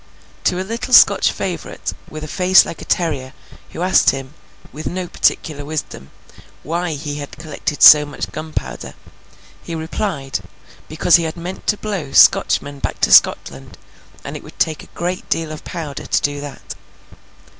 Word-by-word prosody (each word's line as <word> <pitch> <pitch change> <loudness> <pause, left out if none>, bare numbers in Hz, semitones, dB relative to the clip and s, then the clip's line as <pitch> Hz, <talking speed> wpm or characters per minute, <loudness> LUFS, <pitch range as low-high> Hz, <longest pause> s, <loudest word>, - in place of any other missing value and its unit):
To 180 - +1
a 185 - -3
little 235 +3 +1
Scotch - - +6
favourite, - - -5 0.2
with 155 0 -8
a - - -6
face 185 +4 +5
like - - -8
a - - -8
terrier, 140 -7 -1 0.4
who 170 - -5
asked 185 - +4
him 135 +1 -4 0.4
(with 155 - -6
no 180 0 -4
particular 150 -3 -1
wisdom) 145 - -6 0.5
why 170 +2 -2
he 145 0 -5
had 145 -1 -8
collected 155 -1 -3
so 150 -1 +10
much 145 -1 -6
gunpowder, 155 0 -6 0.7
he 165 - -7
replied, 160 -4 -3 0.5
because 160 +2 +4
he 170 - -2
had 160 +2 -5
meant 175 +3 -7
to 210 - +2
blow 195 -11 -5
Scotchmen 140 0 +4
back - - -4
to - - +2
Scotland, 65 0 +3 0.5
and - - -7
it - - -7
would - - -15
take 155 -1 0
a 175 +1 -4
deal 165 -1 -1
of 155 - -8
powder 155 -5 -7
to - - +1
do 145 0 -2
that. 145 -1 -8
155 Hz, 165 wpm, -18 LUFS, 145-175 Hz, 0.7 s, so